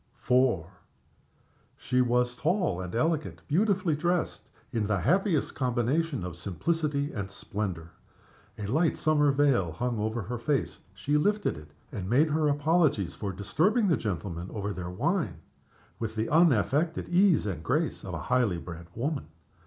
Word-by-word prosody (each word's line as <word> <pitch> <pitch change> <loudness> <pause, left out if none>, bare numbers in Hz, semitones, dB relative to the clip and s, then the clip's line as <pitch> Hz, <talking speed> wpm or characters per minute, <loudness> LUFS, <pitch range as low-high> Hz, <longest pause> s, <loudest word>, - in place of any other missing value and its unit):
IV. 125 -7 +4 1.2
She 125 0 +1
was 125 0 +1
tall 160 - 0
and 90 +3 -6
elegant; 155 +4 -1
beautifully 185 0 +2
dressed, 175 +3 -1 0.2
in 110 -3 0
the 100 -3 0
happiest 180 - +2
combination 130 - 0
of 90 -2 -6
simplicity 145 - -1
and 100 -5 -4
splendor. 95 -5 -5 0.7
A 105 - -5
light 155 - +1
summer 150 -2 +3
veil 135 - +2
hung 120 +5 -2
over 110 +1 -1
her 120 +5 -4
face. 140 +3 -1 0.2
She 145 +11 0
lifted 205 +7 +1
it, 75 0 -11 0.2
and 95 -1 -5
made 150 +6 +3
her 155 0 +2
apologies 145 - +2
for 100 -2 -4
disturbing 185 - +1
the 165 - +4
gentlemen 95 -5 -4
over 105 -1 -3
their 90 -2 -5
wine, 140 - -1 0.6
with 110 -1 -4
the 110 +1 -1
unaffected 155 - +3
ease 175 - +4
and 95 -6 -3
grace 150 - -1
of 90 -2 -5
a 80 -1 -6
highly 115 -4 +2
bred 85 0 -8
woman. 140 - -2
125 Hz, 150 wpm, -28 LUFS, 100-155 Hz, 1.2 s, IV